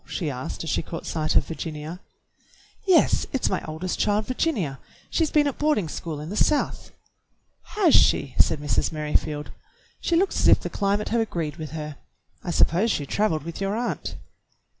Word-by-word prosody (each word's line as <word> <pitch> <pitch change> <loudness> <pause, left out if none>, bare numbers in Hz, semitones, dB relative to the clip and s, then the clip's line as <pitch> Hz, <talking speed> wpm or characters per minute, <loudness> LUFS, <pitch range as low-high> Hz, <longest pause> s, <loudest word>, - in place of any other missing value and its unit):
she 160 -6 -2
asked 130 +4 -5
as 160 - -4
she - - +1
caught 165 - -7
sight 155 -1 -1
of - - +5
Virginia. 160 +1 -6 0.9
"Yes, 370 -3 +4
it's 270 - 0
my - - -1
oldest 160 +4 -4
child, 210 +1 +2
Virginia. 215 - -1 0.3
She's 325 -3 +2
been 300 -1 +3
at 285 - -2
boarding 295 - +2
school 155 0 -5
in 150 +2 -6
the - - -3
South." 295 +6 +1 0.9
"Has 380 -8 +4
she.?" 135 - +4
said - - +4
Mrs. 145 -1 0
Merrifield. 150 -1 -1 0.5
"She 340 - 0
looks 385 +4 +2
as - - +3
if - - +7
the - - -6
climate 205 +1 0
had 230 +1 +2
agreed 165 -8 -3
with 155 -2 -6
her. 150 -2 -5 0.5
I - - -5
suppose 175 +5 +3
she 145 - 0
traveled 160 -2 0
with 170 +4 -7
your 195 +1 0
aunt." 240 +2 -3
170 Hz, 180 wpm, -25 LUFS, 155-230 Hz, 0.9 s, if